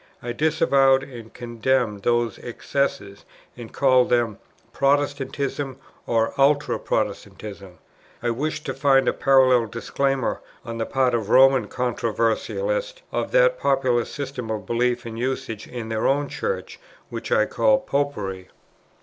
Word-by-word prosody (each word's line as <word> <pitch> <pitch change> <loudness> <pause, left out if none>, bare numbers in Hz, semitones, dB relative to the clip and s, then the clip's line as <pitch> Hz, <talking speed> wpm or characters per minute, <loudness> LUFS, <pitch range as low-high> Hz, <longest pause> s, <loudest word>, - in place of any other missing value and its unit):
I 120 - -3
disavowed 135 -2 +3
and 120 -5 -10
condemned 120 -2 -1
those 120 -1 0
excesses, 115 -5 -3 0.3
and 120 -2 -10
called 130 -2 +3
them 115 -4 +1 0.3
"Protestantism" 140 -1 -1 0.3
or 115 -1 +1
"Ultra 145 +1 +3
Protestantism:" 100 -4 -4 0.5
I 120 - +1
wished 155 +5 -3
to 135 - -2
find 135 -1 +3
a - - +3
parallel 130 -3 +4
disclaimer, 130 +3 -1 0.2
on 115 -1 -6
the 115 - -2
part 130 -2 +1
of 110 -3 -1
Roman 135 0 +5
controversialists, 130 - -1
of - - -2
that - - +4
popular 130 -4 +2
system 135 -5 -6
of 105 -3 -3
beliefs 120 +3 0
and 115 -1 -6
usages 130 -3 -4
in 120 -2 -6
their 110 -1 0
own 140 +1 +1
Church, 480 +1 -4 0.3
which - - -6
I - - +4
called 270 0 +2
"Popery." 105 -10 -2
130 Hz, 130 wpm, -23 LUFS, 115-140 Hz, 0.5 s, Roman